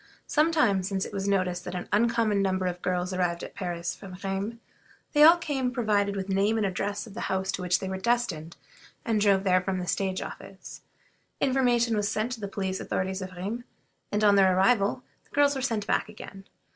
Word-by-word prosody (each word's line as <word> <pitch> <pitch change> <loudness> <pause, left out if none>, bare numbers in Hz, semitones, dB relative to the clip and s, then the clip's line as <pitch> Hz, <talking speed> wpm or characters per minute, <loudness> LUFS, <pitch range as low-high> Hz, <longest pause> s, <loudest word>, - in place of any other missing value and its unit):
Some 310 +2 +2
time 230 -12 +3
since 190 +1 -2
it - - -9
was 195 0 -2
noticed 185 -3 0
that 180 - -6
an 180 - -4
uncommon 220 -1 +2
number 190 -1 0
of 180 -1 -3
girls 180 0 -1
arrived 175 -2 -1
at - - -8
Paris 175 -3 -4
from 185 -3 -10
Rheims. 195 +3 -2 0.6
They 295 - +4
all 325 +3 +9
came 275 -6 -2
provided 210 -5 +1
with 195 -1 -3
the 195 - -3
name 205 +3 +2
and 215 - +1
address 200 +2 -2
of 220 - -12
the 230 - -7
houses 190 0 0
to - - -4
which 180 0 +1
they 190 - -4
were 190 0 -3
destined, 190 -8 -1 0.5
and 220 -2 +1
drove 200 -2 +4
there 185 -1 +3
from 185 0 -2
the 180 - -3
stage 190 +1 -1
office. 195 0 -10 0.6
Information 245 -4 +2
was 205 0 0
sent 220 +3 -1
to 245 - -4
the 200 - -4
police 190 -1 -3
authorities 190 +1 -2
of 185 0 -6
Rheims, 200 +7 -4 0.5
and 210 +1 0
on 205 -1 +6
their 190 -2 +5
arrival 205 +4 +2 0.2
the - - -31
girls 285 0 +4
were 265 - -3
sent 225 -5 -1
back - - 0
again. 200 -2 -11
200 Hz, 215 wpm, -27 LUFS, 185-230 Hz, 0.6 s, all